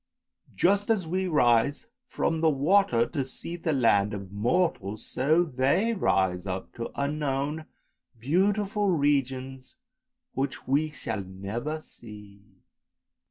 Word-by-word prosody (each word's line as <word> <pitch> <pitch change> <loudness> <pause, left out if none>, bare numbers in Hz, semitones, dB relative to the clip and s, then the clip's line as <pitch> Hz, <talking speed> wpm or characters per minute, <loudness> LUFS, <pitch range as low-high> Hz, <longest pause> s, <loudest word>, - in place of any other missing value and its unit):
Just 200 +4 +2
as 210 -6 +2
we 185 +3 -1
rise 125 -3 +2 0.2
from 165 -7 -1
the 160 - +4
water 145 -4 +3
to 140 +1 -3
see 135 +6 -7
the 170 -1 -2
land 105 -6 +2
of 100 -2 -8
mortals, 110 - -1
so 155 +6 +2
they 155 - +1
rise 95 - +1
up 95 0 -5
to 115 - -5
unknown 145 +1 -2 0.5
beautiful 200 - +1
regions 135 - -1 0.6
which 135 0 -3
we 145 +4 +2
shall 125 -8 -4
never 100 +11 -5
see." 105 -6 -13
140 Hz, 115 wpm, -27 LUFS, 115-165 Hz, 0.6 s, the